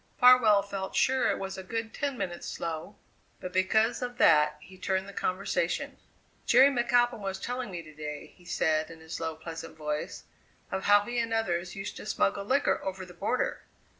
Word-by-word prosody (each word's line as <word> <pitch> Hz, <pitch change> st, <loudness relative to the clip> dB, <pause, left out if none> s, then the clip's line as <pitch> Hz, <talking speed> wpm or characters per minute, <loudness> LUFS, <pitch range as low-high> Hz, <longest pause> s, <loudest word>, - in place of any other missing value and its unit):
Farwell 245 Hz, -5 st, +7 dB
felt 195 Hz, -1 st, -5 dB
sure 260 Hz, 0 st, +3 dB
it -, -, 0 dB
was 190 Hz, 0 st, -5 dB
a -, -, -7 dB
good 225 Hz, +3 st, -4 dB
ten 280 Hz, -3 st, -2 dB
minutes 175 Hz, -5 st, -4 dB
slow; 165 Hz, +5 st, -5 dB, 0.4 s
but 180 Hz, 0 st, -7 dB
because 220 Hz, +6 st, +2 dB
of 245 Hz, -1 st, -4 dB
that 150 Hz, -4 st, +5 dB
he 185 Hz, +5 st, -14 dB
turned 190 Hz, +1 st, -1 dB
the 200 Hz, -, -9 dB
conversation. 185 Hz, +1 st, -1 dB, 0.5 s
"Jerry 260 Hz, +3 st, +7 dB
McAlpin 240 Hz, -1 st, +2 dB
was 195 Hz, -1 st, -4 dB
telling 245 Hz, +2 st, -4 dB
me 175 Hz, -3 st, -6 dB
to 155 Hz, -1 st, -14 dB
day," 150 Hz, -1 st, -7 dB
he 180 Hz, -, -21 dB
said 155 Hz, -2 st, +1 dB
in 165 Hz, -1 st, -11 dB
his 160 Hz, +1 st, -7 dB
low, 160 Hz, -1 st, -3 dB
pleasant 165 Hz, 0 st, -8 dB
voice, 150 Hz, -1 st, -4 dB, 0.5 s
"of 190 Hz, -, -3 dB
how 205 Hz, 0 st, +6 dB
he 240 Hz, +3 st, -3 dB
and 230 Hz, -1 st, 0 dB
others 175 Hz, -5 st, -1 dB
used 195 Hz, +1 st, -6 dB
to -, -, -8 dB
smuggle 200 Hz, -1 st, 0 dB
liquor 270 Hz, +6 st, +1 dB
over 190 Hz, -1 st, -4 dB
the 180 Hz, -, -13 dB
border. 200 Hz, +8 st, -1 dB
190 Hz, 190 wpm, -29 LUFS, 170-230 Hz, 0.5 s, Farwell